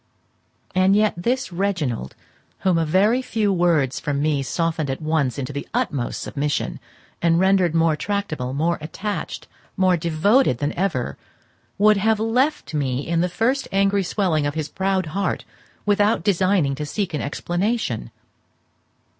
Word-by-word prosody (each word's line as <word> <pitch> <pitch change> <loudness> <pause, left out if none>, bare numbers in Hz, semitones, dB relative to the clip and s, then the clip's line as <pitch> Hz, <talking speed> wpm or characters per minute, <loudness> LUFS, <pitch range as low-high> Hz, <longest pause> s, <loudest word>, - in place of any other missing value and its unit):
And 185 +1 +4
yet 215 0 +3
this 240 +4 -1
Reginald, 165 - -2 0.5
whom 180 -3 +2
a 165 - 0
very 210 +10 +3
few 220 -5 0
words 165 -7 +2
from 145 -1 -2
me 145 -1 +1
softened 160 +1 -1
at 135 - -2
once 155 -5 0
into 140 +1 -4
the 140 - -5
utmost 125 -4 -1
submission, 145 0 -2 0.4
and 170 0 +3
rendered 190 -3 +3
more 165 -1 +3
tractable, 160 -9 -3
more 160 +5 0
attached, 200 +6 -5 0.3
more 185 -1 +4
devoted 170 - +2
than 145 +4 -2
ever, 155 - -2 0.6
would 210 +1 +5
have 220 +2 +2
left 245 - 0
me 135 -2 -1
in 170 0 +1
the 180 - +1
first 250 +9 0
angry 195 +1 +2
swelling 175 -6 0
of 145 - -3
his 155 -1 -3
proud 190 0 0
heart 200 +1 -1 0.4
without 205 +2 +2
deigning 185 -6 +2
to 150 +2 -4
seek 190 +2 -2
an 150 - -1
explanation. 175 - -2
175 Hz, 145 wpm, -22 LUFS, 150-200 Hz, 0.6 s, would